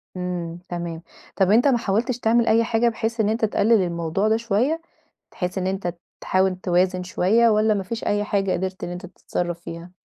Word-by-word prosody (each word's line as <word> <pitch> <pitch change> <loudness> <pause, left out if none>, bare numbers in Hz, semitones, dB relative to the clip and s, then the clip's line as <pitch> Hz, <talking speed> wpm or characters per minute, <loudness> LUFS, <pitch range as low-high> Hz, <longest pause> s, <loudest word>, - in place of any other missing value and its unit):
امم. 175 -2 -4
تمام. 170 -2 -5 0.3
طب 190 -1 +3
أنت 235 +6 +5
ما 265 -3 +4
حاولتش 230 +3 -1
تعمل 230 0 +2
أي 225 +1 +4
حاجة، 230 +1 +2
بحيث 225 +1 -3
إن 210 -1 +2
أنت 220 +1 +1
تقلل 220 0 +3
الموضوع 170 +3 -1
ده 220 +1 +3
شويّة؟ 235 +9 0 0.5
بحيث 180 +1 -4
إن 185 -1 -1
أنت 190 -2 -2 0.3
تحاول 185 0 +1
توازن 180 0 +1
شويّة، 215 +6 +3
والّا 215 0 +3
ما 200 -2 -2
فيش 225 +5 -5
أي 205 0 +1
حاجة 195 -2 0
قدرت 185 +1 -3
إن - - -3
أنت 180 +1 -6
تتصرّف 175 -1 -4
فيها؟ 170 0 -9
195 Hz, 190 wpm, -23 LUFS, 180-225 Hz, 0.5 s, أنت